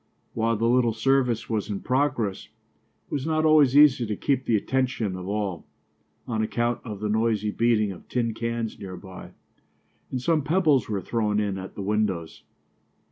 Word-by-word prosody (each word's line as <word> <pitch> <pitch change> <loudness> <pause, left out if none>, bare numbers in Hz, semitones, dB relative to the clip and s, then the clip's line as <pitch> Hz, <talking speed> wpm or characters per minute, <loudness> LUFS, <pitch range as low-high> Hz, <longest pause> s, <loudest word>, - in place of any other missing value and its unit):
While 115 0 0
the 115 - 0
little 120 -1 +3
service 125 0 +1
was 110 -2 -2
in 100 -2 -3
progress, 130 -7 0
it - - -41
was 140 0 -2
not 155 0 +1
always 150 -4 +5
easy 135 -5 +6
to 105 - -2
keep 135 +3 0
the 115 - +2
attention 120 -3 -1
of 90 0 -7
all, 100 -4 -3 0.6
on 110 -2 -1
account 120 +2 -1
of 105 -4 -7
the 105 - -1
noisy 110 -1 +1
beating 110 -2 +2
of 90 - -12
tin 115 -2 -1
cans 115 0 -3
near 95 -2 -7
by; 95 -1 -11 0.8
and 130 - -3
some 155 +4 +1
pebbles 150 - +2
were 100 -3 -1
thrown 105 +1 0
in 100 -2 -1
at 95 - -9
the 100 - -5
windows. 95 -5 -1
115 Hz, 175 wpm, -25 LUFS, 105-130 Hz, 0.8 s, easy